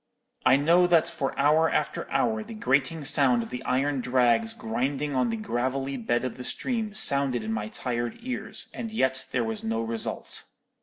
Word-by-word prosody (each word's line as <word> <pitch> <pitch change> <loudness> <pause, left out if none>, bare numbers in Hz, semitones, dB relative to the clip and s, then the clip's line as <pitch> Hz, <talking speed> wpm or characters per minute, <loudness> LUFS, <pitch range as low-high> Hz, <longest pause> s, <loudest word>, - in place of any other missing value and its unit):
I 130 - +7
know 170 +6 +4
that 170 -2 +4
for 160 -5 -3
hour 155 +3 +4
after - - -2
hour 220 -1 +1
the 225 +1 -9
grating 140 -3 +1
sound 130 -4 +4
of - - -10
the 125 - -5
iron 135 +1 +1
drags 120 -3 +2
grinding 135 +6 -2
on 125 -2 +1
the 115 - -2
gravelly 130 +5 -2
bed 120 0 -1
of 130 - -4
the 125 - -7
stream 220 - -3
sounded 140 - +2
in 110 +1 -2
my 105 -1 -2
tired 120 +1 -3
ears, 250 +1 -5
and 230 - -5
yet 130 -12 0
there 120 - +1
was 110 -1 -4
no 115 0 -1
result. 115 0 -3
130 Hz, 185 wpm, -27 LUFS, 120-150 Hz, -, I